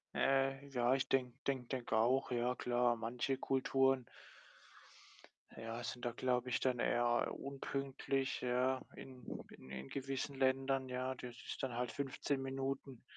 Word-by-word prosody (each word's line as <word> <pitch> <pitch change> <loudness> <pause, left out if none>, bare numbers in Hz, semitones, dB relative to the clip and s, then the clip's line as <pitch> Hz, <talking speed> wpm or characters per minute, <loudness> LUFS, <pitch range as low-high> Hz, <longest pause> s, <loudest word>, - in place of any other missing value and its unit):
Ja, 135 0 +4
ja. - - -7 0.2
Ja, 125 0 +3
ich 135 - 0
denke 125 -2 +2
denke 130 -3 0
denke 120 -4 0
auch, 125 +4 +3
ja 125 +1 +1
klar. 120 -1 +2
Manche 120 +4 -1
Kulturen 135 -1 +3 1.5
ja, 115 +1 -4
sind 120 +2 -4
da, 120 - +1
glaube 125 0 0
ich, 125 - +2
dann 125 -2 +1
eher, 120 0 +2
unpünktlich, 135 0 -2
ja, 125 +1 +2
in 130 -1 -10 0.3
in 65 - -13
in 65 0 -5
gewissen 135 +1 -3
Ländern, 135 0 +2
ja? 130 +1 -1
Das 125 -1 -7
ist - - -4
dann 130 -2 -1
halt 125 -1 -1
15 140 0 -1
Minuten. 135 -1 -3
130 Hz, 150 wpm, -38 LUFS, 120-135 Hz, 1.5 s, Ja